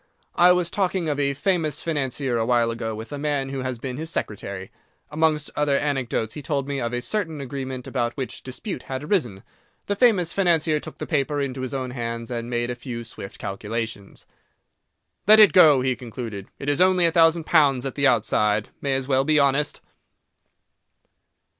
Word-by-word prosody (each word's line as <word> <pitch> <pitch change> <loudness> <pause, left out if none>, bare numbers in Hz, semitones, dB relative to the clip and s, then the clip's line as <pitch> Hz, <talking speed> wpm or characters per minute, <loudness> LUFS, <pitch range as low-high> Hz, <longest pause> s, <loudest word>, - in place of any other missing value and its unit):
I 175 +1 +6
was 180 -1 +1
talking 190 -3 0
of 145 -1 -1
a 140 -1 +1
famous 160 -3 0
financier 135 -5 -2
a - - +1
while 120 -2 +3
ago 115 -1 -4
with 110 +4 -8
a 145 - -5
man 145 -2 -1
who 135 0 -4
had 130 -2 -3
been 130 0 -5
his 160 +2 -3
secretary. 100 - -4 0.4
Amongst 155 -1 +1
other 145 -2 +2
anecdotes, 130 -6 -1
he 150 - -7
told 140 -1 -2
me 140 -2 -2
of 115 - -2
a 120 0 -3
certain 165 0 -2
agreement 130 -1 -5
about 120 -3 -2
which 130 -2 -5
dispute 130 - -6
had 130 +1 -4
arisen. 130 - -1 0.4
The 205 - -1
famous 200 -7 +3
financier 165 -5 +2
took - - -10
the - - -5
paper 145 -1 0
into 135 -2 -3
his 130 +1 -3
own 130 -2 -3
hands 115 -1 -5
and 120 0 -4
made 120 0 -1
a - - -4
few 120 -1 -6
swift 100 -4 -9
calculations. 105 +1 -5 1.0
"Let 215 +1 +9
it 210 -2 +8
go," 155 -7 +7
he 130 0 0
concluded, 115 -5 -7
"it 140 - -8
is 145 +3 +1
only 185 -1 +4
a 165 - +3
thousand 165 0 +4
pounds 140 -6 +3
at 135 - -3
the 140 -1 +2
outside. 105 -3 +1
May 140 -1 0
as 135 -1 -2
well 135 -1 +2
be 155 +2 +2
honest." 140 0 +1
135 Hz, 190 wpm, -24 LUFS, 120-155 Hz, 1.0 s, Let